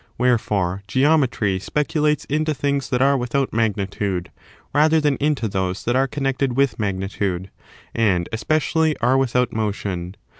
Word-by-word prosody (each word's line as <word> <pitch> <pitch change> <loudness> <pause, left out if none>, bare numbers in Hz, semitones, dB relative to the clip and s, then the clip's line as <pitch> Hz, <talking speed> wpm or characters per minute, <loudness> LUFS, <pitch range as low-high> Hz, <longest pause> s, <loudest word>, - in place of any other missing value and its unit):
Wherefore, 105 -7 +1
Geometry 130 -6 +2
speculates 150 - 0
into 155 +1 0
things 140 -1 -1
that 125 0 +2
are 140 +1 +4
without 130 +1 -1
magnitude, 100 -4 -1 0.4
rather 155 +2 +4
than 145 -2 +2
into 145 -5 0
those 95 -1 -2
that 120 - +1
are 135 +1 +3
connected 135 -2 -1
with 140 -3 +2
magnitude, 95 -2 -2 0.4
and 95 -7 +1
especially 155 +6 +1
are 125 +3 +2
without 125 -2 +1
motion. 100 -4 -3
125 Hz, 135 wpm, -21 LUFS, 100-140 Hz, 0.4 s, are